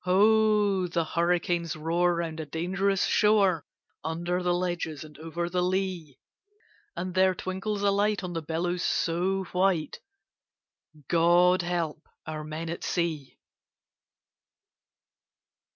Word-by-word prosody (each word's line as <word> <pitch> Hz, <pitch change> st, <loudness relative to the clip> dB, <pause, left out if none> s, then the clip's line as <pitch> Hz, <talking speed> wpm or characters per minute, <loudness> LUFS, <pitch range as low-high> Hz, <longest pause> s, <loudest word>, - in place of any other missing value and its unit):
Ho! 205 Hz, 0 st, +3 dB
the 170 Hz, -1 st, 0 dB
hurricanes 170 Hz, 0 st, 0 dB
roar 170 Hz, +3 st, +1 dB
round 165 Hz, -1 st, -3 dB
a 160 Hz, -, -4 dB
dangerous 190 Hz, +5 st, 0 dB
shore, 200 Hz, -6 st, +3 dB, 0.4 s
Under 175 Hz, +3 st, -2 dB
the 180 Hz, 0 st, +1 dB
ledges 175 Hz, -4 st, -3 dB
and 155 Hz, -1 st, -13 dB
over 165 Hz, +2 st, -3 dB
the 180 Hz, +1 st, -1 dB
lea; 180 Hz, -6 st, -2 dB, 0.8 s
And 185 Hz, 0 st, -4 dB
there 185 Hz, 0 st, +3 dB
twinkles 195 Hz, +3 st, -3 dB
a 200 Hz, -, +4 dB
light 205 Hz, 0 st, +1 dB
on 180 Hz, -1 st, -4 dB
the 165 Hz, -, -3 dB
billows 175 Hz, +3 st, -2 dB
so 185 Hz, +4 st, 0 dB
white 180 Hz, -3 st, +1 dB, 1.1 s
God 175 Hz, +2 st, +4 dB
help 170 Hz, -3 st, -2 dB, 0.2 s
our 155 Hz, -1 st, -5 dB
men 155 Hz, +2 st, -5 dB
at 170 Hz, +1 st, -5 dB
sea! 160 Hz, -6 st, -2 dB
175 Hz, 120 wpm, -27 LUFS, 165-190 Hz, 1.1 s, a